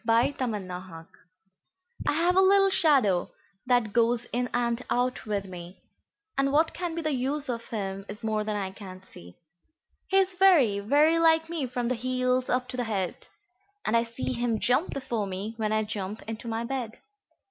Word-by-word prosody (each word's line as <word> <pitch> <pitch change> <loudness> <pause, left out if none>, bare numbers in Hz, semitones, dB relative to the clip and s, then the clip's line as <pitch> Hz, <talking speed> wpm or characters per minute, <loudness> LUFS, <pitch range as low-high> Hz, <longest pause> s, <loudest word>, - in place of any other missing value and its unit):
XVIIIMy 230 -4 +1
Shadow 180 -3 -8 1.0
I - - +3
have 340 +4 +2
a 380 - +6
little 390 0 +5
shadow 260 - +3 0.4
that 240 -4 +2
goes 235 0 +2
in 245 +1 0
and 240 0 0
out 250 -1 -1
with 200 -2 -1
me, 180 -1 -10 0.6
And 275 0 +1
what 315 +3 +3
can 345 -2 -4
be 335 - -3
the 310 -1 0
use 275 +3 -2
of 230 -1 -4
him 195 -2 -4
is 210 +3 -8
more 215 -1 0
than 210 0 -2
I 195 -2 -3
can 190 -2 -11
see. 90 - -14 0.7
He 385 - +2
is 385 -1 +3
very, 340 - +5
very 295 +10 +3
like 325 0 +4
me 320 -6 -2
from 245 -1 -2
the 255 - +1
heels 255 +1 0
up 250 0 0
to 255 - -6
the 245 - -1
head; 195 -5 -3 0.6
And 215 - +1
I 230 - +5
see 235 +2 -4
him 235 -2 0
jump 250 - +2
before 235 -6 -3
me, 195 +4 -4
when 215 -2 -1
I 215 0 +2
jump 210 0 -5
into 225 +1 -7
my 225 0 -2
bed. 240 -2 -4
235 Hz, 185 wpm, -27 LUFS, 210-275 Hz, 1.0 s, a